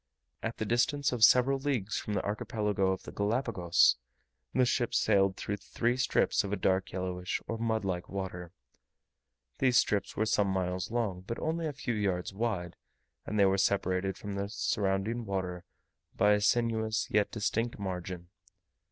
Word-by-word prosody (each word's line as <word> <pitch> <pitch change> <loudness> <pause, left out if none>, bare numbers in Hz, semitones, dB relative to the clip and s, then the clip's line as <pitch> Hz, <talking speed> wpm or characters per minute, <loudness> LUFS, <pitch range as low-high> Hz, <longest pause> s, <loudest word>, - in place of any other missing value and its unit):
At 115 - -4
the 110 - -2
distance 140 +5 +1
of 120 -3 0
several 130 +4 +6
leagues 125 -8 -1
from 105 - -4
the 95 - 0
Archipelago 105 -1 -1
of 95 - -3
the - - -8
Galapagos, 100 -5 +2 0.5
the 130 - +3
ship 120 -1 0
sailed 95 -3 +3
through 100 - -3
three 120 +4 -1
strips 125 -1 +2
of 100 - -5
a - - +1
dark 95 -1 0
yellowish, 90 -1 -3
or 115 - -3
mud 110 -2 0
like 90 -2 -3
water; 90 -3 -5 1.1
these 125 -2 +4
strips 105 -3 +1
were 110 - +2
some 105 -2 +2
miles 90 -1 -1
long, 110 -6 -1
but 115 - -3
only 165 +1 -1
a - - -2
few 135 -3 -3
yards 95 -4 -1
wide, 95 -5 -2 0.5
and 105 - -2
they 100 - +6
were 95 0 +2
separated 95 -1 +1
from 100 -1 -6
the 100 0 -3
surrounding 105 +1 -1
water 90 -3 -3 0.5
by 105 - +4
a 105 0 +3
sinuous 110 0 +1
yet 105 0 +3
distinct 115 +2 -1
margin. 90 -3 -5
105 Hz, 165 wpm, -30 LUFS, 95-115 Hz, 1.1 s, several